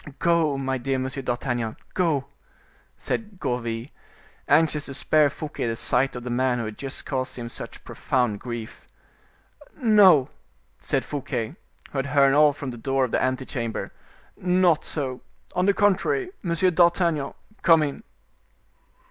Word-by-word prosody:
"Go, 165 Hz, -4 st, +2 dB
my 135 Hz, -1 st, -2 dB
dear 135 Hz, +2 st, -1 dB
Monsieur 130 Hz, +1 st, -3 dB
d'Artagnan, 120 Hz, -3 st, -2 dB, 0.2 s
go," 160 Hz, -7 st, +1 dB, 0.7 s
said 210 Hz, -4 st, -4 dB
Gourville, 115 Hz, -2 st, -2 dB, 0.6 s
anxious 155 Hz, -2 st, +3 dB
to 135 Hz, -, -6 dB
spare 155 Hz, +1 st, +3 dB
Fouquet 145 Hz, -4 st, -5 dB
the 115 Hz, -, -1 dB
sight 125 Hz, +4 st, +1 dB
of 120 Hz, -, -6 dB
the 125 Hz, -, -4 dB
man 125 Hz, 0 st, +1 dB
who 115 Hz, -, -2 dB
had 110 Hz, 0 st, -6 dB
just 135 Hz, 0 st, -4 dB
caused 130 Hz, -2 st, -3 dB
him 120 Hz, -1 st, -5 dB
such -, -, -7 dB
profound 125 Hz, -6 st, -1 dB
grief. 120 Hz, -2 st, -7 dB, 0.9 s
"No," 205 Hz, -, +6 dB, 0.5 s
said -, -, -1 dB
Fouquet, 135 Hz, -3 st, -4 dB, 0.4 s
who 140 Hz, -, -2 dB
had 135 Hz, -, -2 dB
heard 140 Hz, -1 st, +4 dB
all 150 Hz, 0 st, +6 dB
from 140 Hz, -2 st, -6 dB
the 120 Hz, -, -9 dB
door 135 Hz, +2 st, +1 dB
of 120 Hz, -, -7 dB
the -, -, +1 dB
ante 130 Hz, 0 st, 0 dB
chamber; 115 Hz, -5 st, -4 dB, 0.4 s
"not 180 Hz, -3 st, +2 dB
so; 130 Hz, -4 st, -3 dB, 0.3 s
on 180 Hz, +1 st, +2 dB
the 200 Hz, -, +5 dB
contrary, 205 Hz, -, +1 dB
Monsieur 175 Hz, +1 st, +2 dB
d'Artagnan, 170 Hz, -4 st, +2 dB, 0.3 s
come 165 Hz, -3 st, +6 dB
in." 145 Hz, +8 st, -4 dB
135 Hz, 150 wpm, -25 LUFS, 125-165 Hz, 0.9 s, No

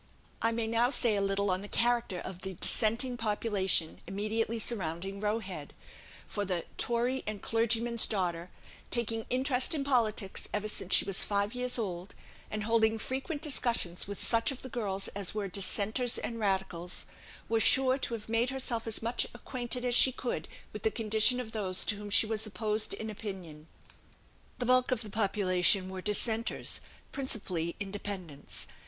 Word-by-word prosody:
I 230 Hz, -, +2 dB
may 230 Hz, 0 st, -1 dB
now 230 Hz, +2 st, +2 dB
say 240 Hz, -4 st, +4 dB
a 200 Hz, -, +1 dB
little 195 Hz, 0 st, +1 dB
on 185 Hz, +1 st, -1 dB
the 205 Hz, -, -7 dB
character 235 Hz, -4 st, +1 dB
of 185 Hz, 0 st, -7 dB
the 190 Hz, -1 st, -6 dB
Dissenting 235 Hz, +7 st, +2 dB
population 205 Hz, -6 st, +1 dB
immediately 215 Hz, +4 st, -1 dB
surrounding 195 Hz, -3 st, -2 dB
Roe 210 Hz, +1 st, 0 dB
Head; 185 Hz, -9 st, -7 dB, 0.5 s
for 205 Hz, -, -3 dB
the 180 Hz, -4 st, -2 dB
"Tory 245 Hz, +2 st, +1 dB
and 210 Hz, -1 st, -2 dB
clergyman's 230 Hz, +1 st, +4 dB
daughter," 180 Hz, -4 st, -2 dB, 0.4 s
"taking 225 Hz, -2 st, 0 dB
interest 255 Hz, +3 st, +2 dB
in 285 Hz, -, -1 dB
politics 225 Hz, -7 st, 0 dB
ever 210 Hz, 0 st, -2 dB
since 195 Hz, -3 st, 0 dB
she -, -, +5 dB
was 195 Hz, -1 st, 0 dB
five 200 Hz, +1 st, 0 dB
years 250 Hz, 0 st, -2 dB
old," 185 Hz, -4 st, -4 dB, 0.3 s
and 215 Hz, 0 st, -3 dB
holding 225 Hz, 0 st, +2 dB
frequent 270 Hz, +6 st, -4 dB
discussions 235 Hz, -, -1 dB
with 200 Hz, -1 st, -6 dB
such 230 Hz, -1 st, +2 dB
of 265 Hz, -, -8 dB
the 260 Hz, -, -7 dB
girls 200 Hz, -5 st, -2 dB
as 200 Hz, 0 st, -3 dB
were 205 Hz, -2 st, -2 dB
Dissenters 205 Hz, +6 st, +1 dB
and 230 Hz, -1 st, -4 dB
Radicals, 190 Hz, -4 st, -2 dB, 0.4 s
was 225 Hz, 0 st, +1 dB
sure 260 Hz, +2 st, +4 dB
to 235 Hz, -, -1 dB
have 215 Hz, -2 st, -9 dB
made 230 Hz, +2 st, +1 dB
herself 250 Hz, -4 st, -2 dB
as 225 Hz, 0 st, -3 dB
much 235 Hz, +2 st, 0 dB
acquainted 245 Hz, 0 st, -1 dB
as 245 Hz, -, +2 dB
she 260 Hz, +2 st, +9 dB
could 250 Hz, -1 st, -4 dB, 0.3 s
with -, -, -6 dB
the 440 Hz, -, +2 dB
condition 220 Hz, -, +3 dB
of 230 Hz, -3 st, -5 dB
those 190 Hz, -4 st, 0 dB
to 205 Hz, -, +1 dB
whom 205 Hz, 0 st, -7 dB
she 205 Hz, -, +5 dB
was 220 Hz, 0 st, -1 dB
opposed 215 Hz, +2 st, -1 dB
in 220 Hz, 0 st, -5 dB
opinion. 180 Hz, -8 st, -8 dB, 0.9 s
The 245 Hz, -, -2 dB
bulk 255 Hz, +1 st, +4 dB
of 245 Hz, -2 st, 0 dB
the 210 Hz, -, -9 dB
population 195 Hz, -2 st, +2 dB
were 190 Hz, -1 st, -6 dB
Dissenters, 220 Hz, +3 st, +1 dB, 0.3 s
principally 185 Hz, -11 st, -3 dB
Independents. 195 Hz, -7 st, -6 dB
215 Hz, 170 wpm, -31 LUFS, 195-235 Hz, 0.9 s, she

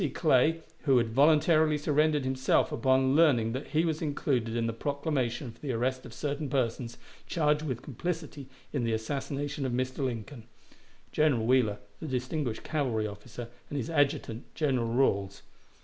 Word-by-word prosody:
Clay, 160 Hz, +1 st, +3 dB, 0.2 s
who 135 Hz, -3 st, +5 dB
had 115 Hz, -2 st, +1 dB
voluntarily 155 Hz, +2 st, +4 dB
surrendered 150 Hz, 0 st, +2 dB
himself 130 Hz, 0 st, +2 dB
upon 130 Hz, 0 st, +2 dB
learning 135 Hz, -9 st, +4 dB
that 130 Hz, +4 st, -4 dB
he 160 Hz, +2 st, +1 dB
was 160 Hz, -2 st, -1 dB
included 130 Hz, -6 st, -1 dB
in 115 Hz, -1 st, 0 dB
the 115 Hz, -, -1 dB
proclamation 140 Hz, -1 st, -2 dB
for 115 Hz, -, -21 dB
the 145 Hz, -, -3 dB
arrest 130 Hz, +2 st, -1 dB
of -, -, -12 dB
certain 145 Hz, +2 st, -3 dB
persons 120 Hz, -2 st, -1 dB, 0.3 s
charged 150 Hz, -3 st, +1 dB
with 130 Hz, -5 st, -4 dB
complicity 150 Hz, 0 st, -5 dB, 0.3 s
in 135 Hz, -5 st, 0 dB
the 115 Hz, -1 st, 0 dB
assassination 140 Hz, +5 st, -3 dB
of 130 Hz, -2 st, -1 dB
Mr. 130 Hz, +2 st, -2 dB
Lincoln; 120 Hz, -1 st, -4 dB, 0.7 s
General 140 Hz, -7 st, +2 dB
Wheeler, 120 Hz, -4 st, +3 dB, 0.2 s
the 160 Hz, -, -6 dB
distinguished 130 Hz, -1 st, -2 dB
cavalry 125 Hz, -8 st, -1 dB
officer, 115 Hz, +3 st, -8 dB, 0.2 s
and 145 Hz, -, -3 dB
his 130 Hz, +2 st, -3 dB
adjutant, 140 Hz, -6 st, 0 dB
General 130 Hz, -7 st, +1 dB
Ralls. 100 Hz, -6 st, +1 dB
130 Hz, 155 wpm, -29 LUFS, 120-150 Hz, 0.7 s, who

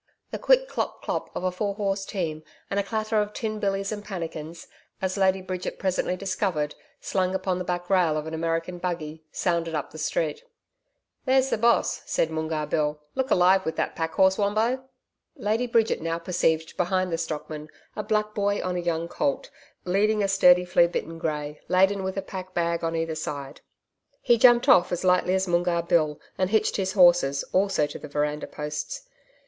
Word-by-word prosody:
The -, -, -4 dB
quick -, -, +4 dB
CLOP -, -, -3 dB
CLOP -, -, -3 dB
of -, -, -3 dB
a 185 Hz, -, +1 dB
four 200 Hz, +2 st, -2 dB
horse 195 Hz, -1 st, -1 dB
team 165 Hz, -7 st, -3 dB, 0.3 s
and 200 Hz, -, +1 dB
a -, -, +1 dB
clatter 215 Hz, +1 st, 0 dB
of 210 Hz, 0 st, -4 dB
tin 215 Hz, -2 st, -3 dB
billys 195 Hz, 0 st, -1 dB
and 205 Hz, -1 st, -5 dB
pannikins 165 Hz, -4 st, -6 dB, 0.3 s
as 190 Hz, -1 st, -1 dB
Lady 190 Hz, -1 st, +2 dB
Bridget 185 Hz, -1 st, -4 dB
presently 185 Hz, -1 st, 0 dB
discovered 185 Hz, -6 st, -1 dB, 0.3 s
slung 185 Hz, -1 st, -1 dB
upon 185 Hz, -1 st, -1 dB
the -, -, -2 dB
back 175 Hz, 0 st, -3 dB
rail 175 Hz, -5 st, +3 dB
of 155 Hz, -, -3 dB
an 160 Hz, -, -6 dB
American 165 Hz, +2 st, -2 dB
buggy 160 Hz, -3 st, -4 dB
sounded 170 Hz, -2 st, -1 dB
up 150 Hz, -, -3 dB
the 155 Hz, -, -9 dB
street. 480 Hz, -, -1 dB, 0.8 s
'There's 265 Hz, 0 st, +3 dB
the -, -, +2 dB
Boss,' 235 Hz, +1 st, +2 dB
said 160 Hz, -, 0 dB
Moongarr 160 Hz, -1 st, -2 dB
Bill. 150 Hz, 0 st, -1 dB
'Look 265 Hz, 0 st, -1 dB
alive, 185 Hz, +1 st, +4 dB
with 160 Hz, -2 st, -3 dB
that -, -, -2 dB
packhorse, 190 Hz, +5 st, +2 dB
Wombo.' 220 Hz, +6 st, +1 dB, 0.5 s
Lady 220 Hz, +4 st, 0 dB
Bridget 230 Hz, -5 st, +2 dB
now 165 Hz, +1 st, -1 dB
perceived 165 Hz, -2 st, 0 dB
behind 185 Hz, 0 st, 0 dB
the -, -, +1 dB
stockman 155 Hz, -1 st, -5 dB, 0.3 s
a -, -, -2 dB
black 215 Hz, 0 st, 0 dB
boy 205 Hz, -1 st, 0 dB
on 180 Hz, -1 st, -2 dB
a -, -, -1 dB
young 170 Hz, -1 st, -1 dB
colt, 290 Hz, -, -2 dB, 0.3 s
leading 205 Hz, +3 st, +2 dB
a -, -, +2 dB
sturdy 180 Hz, -2 st, +5 dB
flea 175 Hz, -1 st, +4 dB
bitten 165 Hz, -1 st, -4 dB
grey, 150 Hz, -2 st, -3 dB
laden 190 Hz, +2 st, +3 dB
with 190 Hz, +1 st, -3 dB
a 195 Hz, -, -1 dB
pack 185 Hz, -1 st, -8 dB
bag 170 Hz, -1 st, 0 dB
on 165 Hz, 0 st, -1 dB
either 165 Hz, 0 st, -1 dB
side. 145 Hz, -2 st, -6 dB, 0.6 s
He 240 Hz, -2 st, +3 dB
jumped 240 Hz, -1 st, +6 dB
off 180 Hz, -, +6 dB
as 175 Hz, 0 st, -2 dB
lightly 180 Hz, 0 st, +3 dB
as 190 Hz, 0 st, 0 dB
Moongarr 175 Hz, -1 st, +1 dB
Bill 155 Hz, -3 st, +1 dB, 0.2 s
and 185 Hz, -1 st, +2 dB
hitched 220 Hz, +1 st, +2 dB
his 190 Hz, -1 st, -1 dB
horses 175 Hz, -7 st, +5 dB
also 190 Hz, -5 st, +2 dB
to -, -, -7 dB
the -, -, -8 dB
veranda 150 Hz, +1 st, -2 dB
posts. 150 Hz, 0 st, -5 dB
180 Hz, 185 wpm, -26 LUFS, 165-200 Hz, 0.8 s, jumped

